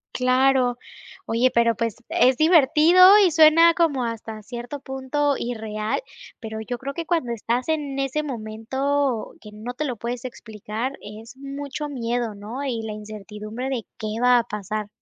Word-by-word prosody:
Claro. 255 -1 +3 0.5
Oye, 240 +3 +2
pero 235 -1 +3
pues, 230 -2 -2
es 255 0 +3
divertido 330 +5 +6
y 380 -4 +5
suena 320 +2 +6
como 300 -7 +1
hasta 225 -1 -6
cierto 240 +5 -7
punto 275 +2 -1
irreal, 220 - -3 0.4
pero 220 -1 -6
yo 245 +2 -4
creo 275 +3 -6
que 335 +3 -5
cuando 320 -8 0
estás 235 +2 -2
en 295 -4 -2
ese 275 +3 -1
momento 265 +1 -2
que 210 - -11
no 215 +4 -7
te 275 - -3
lo 255 -5 -3
puedes 235 +3 -5
explicar, 225 0 -5
es 220 +4 -11
mucho 280 +2 -6
miedo, 240 -3 -2
¿no?, 215 +7 -7
y 245 -5 -2
la 220 -1 -5
incertidumbre 215 +3 -7
de, 250 -5 -3
¿qué 215 0 -4
va 250 0 +5
a - - -1
pasar? 210 -1 -5
245 Hz, 160 wpm, -23 LUFS, 220-280 Hz, 0.5 s, divertido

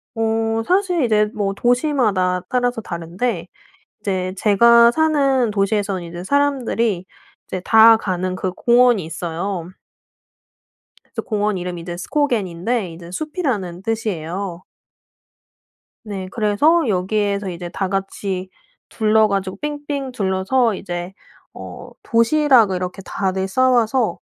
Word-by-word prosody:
어 225 0 0
사실 360 -4 +2
이제 215 -2 +3
뭐 200 -2 -1
도시마다 240 - +1
따라서 245 -2 0
다른데 175 +2 -3 0.5
이제 185 -3 -2
제가 235 +4 +6
사는 275 -6 +2
도시에서는 200 -2 0
이제 175 +1 -8
사람들이 235 -8 0 0.4
이제 185 - -4
다 225 0 +7
가는 185 -2 -2
그 185 0 -2
공원이 240 -4 +3
있어요. 170 +2 -4 1.5
그래서 - - -5
공원 210 -2 0
이름이 175 -1 -5
이제 175 0 -6
스코겐인데 210 - -1
이제 170 +1 -11
숲이라는 215 - -3
뜻이에요. 190 -4 -3 1.4
네. 195 -3 -5
그래서 245 +9 +2
여기에서 200 +1 0
이제 175 0 -6
다 190 +2 -2
같이 195 -1 -3 0.4
둘러 220 -1 +3
가지고 195 -1 -2
삥삥 290 -2 -4
둘러서 205 +2 +1
이제 175 +1 -6 0.4
어 - - -9
도시락을 230 -4 +4
이렇게 180 +1 -4
다들 190 0 -2
싸와서 245 -2 +2
205 Hz, 265 characters per minute, -20 LUFS, 185-245 Hz, 1.5 s, 다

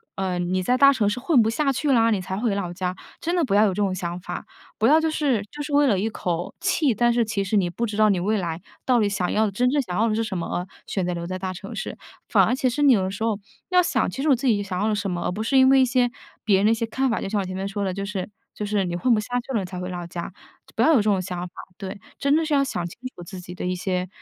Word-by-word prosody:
“呃， 185 -2 -1
你 180 +1 0
在 250 +7 +2
大 275 +1 +7
城 225 -7 +1
市 205 - -2
混 270 -1 +4
不 220 - +2
下 275 +4 +1
去 285 +3 -1
啦， 230 -2 +4
你 210 - +1
才 190 +1 -4
回 215 -2 0
老 180 -3 -3
家。 180 0 -2 0.3
“真 340 - -1
的 350 -2 +2
不 200 - 0
要 210 - +6
有 - - +3
这 - - -7
种 195 -2 +1
想 175 -1 -4
法。 180 - -6 0.3
不 220 - +3
要 310 +3 +6
就 320 - +1
是， 285 -8 +1
就 295 0 -6
是 295 - -6
为 285 0 +5
了 205 - +3
一 210 +4 0
口 175 -4 -3
气， 335 -7 +2
但 240 +2 +2
是 235 0 +3
其 215 -2 -2
实 195 - -1
你 190 -4 +2
不 230 +7 -2
知 210 -2 -4
道 215 0 +4
你 195 -3 +2
未 210 +4 +1
来 170 -2 -3 0.2
到 250 -2 +4
底 210 - +3
想 195 -3 -1
要 220 +1 +2
的， 205 - -1
真 250 +5 +2
正 285 +2 +2
想 180 -9 -4
要 225 +2 +3
的 215 - 0
是 225 - 0
什 195 -4 -3
么， 170 - -3
而 180 +1 -4 0.2
选 190 -3 -1
择 180 - -1
留 170 0 -4
在 185 +1 -4
大 185 0 -3
城 180 - -8
市。 - - -5 0.3
反 - - +4
而 - - +1
其 260 0 +1
实 250 +5 -2
你 280 - +7
有 205 - +3
的 185 - -1
时 200 +3 -5
候， 220 -3 0 0.3
要 365 -1 +5
想， 350 - +1
其 270 - -5
实 300 - -1
我 275 - +6
自 260 +3 -5
己 220 -5 +3
想 190 -2 -4
要 215 - +1
了 - - +1
什 200 -1 -2
么， 175 -1 -2
而 - - 0
不 205 +4 -4
是 250 +5 +2
因 260 0 +7
为 270 0 +6
一 - - +5
些 250 -1 +2 0.3
别 205 -3 +4
人 195 - +2
的 215 - +5
一 - - +5
些 230 - -2
看 265 +4 0
法。 230 - -1
就 - - -3
像 210 - 0
我 195 - -2
前 185 0 -5
面 190 +1 -3
说 200 0 -3
的， 190 - -1
就 195 +1 -4
是 200 -2 -4 0.2
就 210 - -4
是 205 -1 0
你 175 -1 -3
混 245 +7 +3
不 220 - +3
下 215 +3 -7
去 255 +2 -7
了 225 - +2
你 - - -4
才 180 0 -7
回 180 0 -4
老 175 -1 -5
家， 170 0 -5 0.4
就 - - -20
不 - - 0
要 - - +5
有 - - +6
这 215 - +2
种 205 -2 +2
想 180 -1 -5
法， 175 - -20 0.2
对。 195 -2 -6 0.2
真 280 +1 +3
的 320 +1 +2
是 310 - -1
要 280 - +4
想 175 -10 -3
清 175 - -9 0.2
楚 175 - -9
自 180 +2 -8
己 180 0 -9
的 - - -5
一 180 - 0
些 180 0 -2
210 Hz, 360 characters per minute, -24 LUFS, 185-250 Hz, 0.4 s, 大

